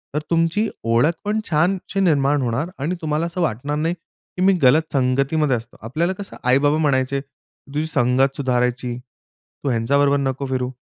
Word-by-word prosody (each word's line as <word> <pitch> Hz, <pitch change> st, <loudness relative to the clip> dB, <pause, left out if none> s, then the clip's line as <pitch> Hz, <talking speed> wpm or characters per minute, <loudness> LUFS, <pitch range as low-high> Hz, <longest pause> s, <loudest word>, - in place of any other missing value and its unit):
तर -, -, +2 dB
तुमची 165 Hz, +6 st, +1 dB, 0.2 s
ओळखपण 160 Hz, -, +1 dB
छानशी 180 Hz, +5 st, 0 dB
निर्माण 145 Hz, -6 st, +2 dB
होणार 130 Hz, +7 st, -1 dB
आणि 155 Hz, +7 st, -1 dB
तुम्हाला 155 Hz, +1 st, -1 dB
असं 170 Hz, +1 st, -4 dB
वाटणार 145 Hz, -1 st, -1 dB
नाही, 165 Hz, +3 st, 0 dB
की 180 Hz, +1 st, -12 dB
मी 195 Hz, -, +6 dB
गलत 155 Hz, +5 st, +4 dB
संगतीमध्ये 140 Hz, +2 st, +1 dB
असतो. 115 Hz, +1 st, -11 dB
आपल्याला 160 Hz, +11 st, -1 dB
कसं 200 Hz, -, -7 dB
आई-बाबा 140 Hz, +4 st, +3 dB
म्हणायचे 140 Hz, -3 st, +1 dB
तुझी 140 Hz, +1 st, -8 dB
संगत 135 Hz, -1 st, +2 dB
सुधारायची, 125 Hz, -2 st, -1 dB
तू 125 Hz, +2 st, -11 dB
ह्यांच्याबरोबर 140 Hz, +4 st, +2 dB
नको 140 Hz, 0 st, -2 dB
फिरू. 130 Hz, -1 st, -2 dB
140 Hz, 150 wpm, -21 LUFS, 130-160 Hz, 0.2 s, मी